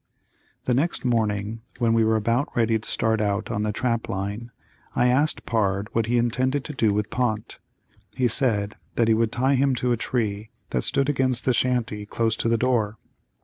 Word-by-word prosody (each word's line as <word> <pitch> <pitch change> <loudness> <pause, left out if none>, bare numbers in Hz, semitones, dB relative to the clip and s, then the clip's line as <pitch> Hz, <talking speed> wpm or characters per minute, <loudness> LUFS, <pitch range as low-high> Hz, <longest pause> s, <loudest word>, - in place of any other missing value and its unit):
The 125 - +1
next 145 +3 0
morning 110 -2 0 0.2
when 115 -2 +2
we 115 0 +4
were 110 0 +2
about 115 +5 +1
ready 115 -1 +2
to 105 - -4
start 110 -1 +1
out 105 +1 -1
on 110 -2 -1
the 105 0 0
trap 115 +1 -1
line 100 +5 -4 0.5
I 125 - +3
asked 145 +5 +1
Pard 100 -2 0
what 115 -1 +1
he 120 +1 +2
intended 130 +4 +1
to 150 - -6
do 110 -6 +2
with 105 0 -1
Pont. 115 -3 -2 0.6
He 125 - +3
said 110 -4 +1 0.2
that 115 - +2
he 115 - +5
would 110 0 +1
tie 130 +3 +1
him 135 0 +2
to 125 0 0
a 120 - +2
tree 110 -3 -2 0.2
that - - 0
stood 140 - +2
against 130 -4 +1
the 130 - +3
shanty 115 -5 0
close 115 0 0
to 115 - 0
the 115 - +3
door. 115 -3 0
115 Hz, 195 wpm, -24 LUFS, 110-125 Hz, 0.6 s, he